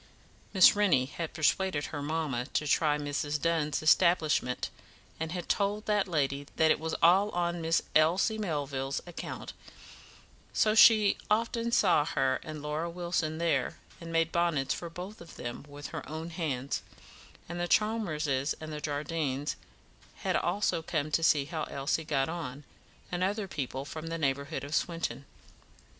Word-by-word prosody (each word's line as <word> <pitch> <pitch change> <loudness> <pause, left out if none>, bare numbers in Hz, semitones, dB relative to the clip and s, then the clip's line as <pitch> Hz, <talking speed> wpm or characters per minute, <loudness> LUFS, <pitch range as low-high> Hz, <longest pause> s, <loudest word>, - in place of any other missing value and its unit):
Miss 190 -1 +7
Rennie 185 -11 +3
had 160 +4 -5
persuaded 160 0 +1
her 145 - -3
mamma 145 -5 -2
to 155 - +1
try 150 +1 +3
Mrs. 145 0 -2
Dunn's 155 -3 0
establishment, 155 -6 +3 0.5
and 160 0 -3
had 175 -1 -4
told 205 +1 0
that 210 -2 +1
lady 145 -4 -1
that 160 -1 +4
it - - +2
was 160 +1 -3
all 190 +5 +6
on 175 -1 -1
Miss 165 +1 +2
Elsie 180 +8 +3
Melville's 140 -7 -2
account, 175 -2 -7 1.0
so 215 - +3
she 220 -2 +7
often 230 +2 +1
saw 185 - +4
her 135 -2 0
and 155 -2 -7
Laura 150 +3 -2
Wilson 170 -2 -2
there, 170 0 0 0.2
and 165 0 -7
made 165 0 +2
bonnets 170 -6 +1
for 170 - -6
both 180 +5 -8
of 170 - -12
them 120 +3 -6
with 145 -1 -8
her - - -5
own 160 +2 -5
hands; 140 -6 -2 0.7
and 175 +1 -5
the 175 - -1
Chalmerses 155 -11 +1
and 155 -1 -6
Jardines 145 -1 -2 0.7
had - - +1
also 200 -5 +1
come 155 -2 -2
to 165 - +2
see 150 -3 +4
how 155 +1 -3
Elsie 140 +4 -1
got 135 -3 +1
on, 155 -4 -5 0.5
and 180 0 -1
other 200 +2 -1
people 135 -4 -4
from 155 +2 -7
the 165 0 -3
neighbourhood 140 -1 -1
of 140 +1 -6
Swinton. 155 -6 -1
160 Hz, 155 wpm, -30 LUFS, 145-175 Hz, 1.0 s, Miss